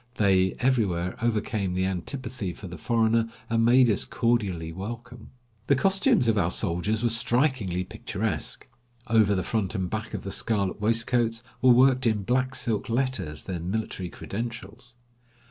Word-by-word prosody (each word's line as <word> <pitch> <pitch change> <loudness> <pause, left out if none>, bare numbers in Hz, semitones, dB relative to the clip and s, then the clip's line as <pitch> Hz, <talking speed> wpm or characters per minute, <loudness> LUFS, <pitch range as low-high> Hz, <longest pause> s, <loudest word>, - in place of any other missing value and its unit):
They 95 -2 +3
everywhere 100 -9 +1
overcame 105 -5 -1
the 95 0 +1
antipathy 100 +2 -4
for 100 - -11
the 85 -2 -9
foreigner, 115 +3 +2 0.2
and 115 0 +2
made 125 +2 +6
us 105 -4 +2
cordially 100 -9 -1
welcome. 115 +5 -8 0.4
The 140 - +4
costumes 195 - +3
of 110 -2 +3
our 85 -3 +2
soldiers 100 +6 -1
were 120 - +3
strikingly 115 - +2
picturesque. 95 -2 -4 0.4
Over 110 -3 +3
the 95 - -1
front 110 -3 -2
and 95 -3 -2
back 110 +1 -4
of - - -5
the 100 - -5
scarlet 100 -2 -1
waistcoats 115 +1 +1 0.2
were 130 - +5
worked 130 0 +4
in 105 -3 +1
black 130 +4 0
silk 115 -4 -2
letters 115 - -2
their 90 -3 -4
military 95 0 -3
credentials. 115 +4 -7
110 Hz, 150 wpm, -26 LUFS, 95-120 Hz, 0.4 s, made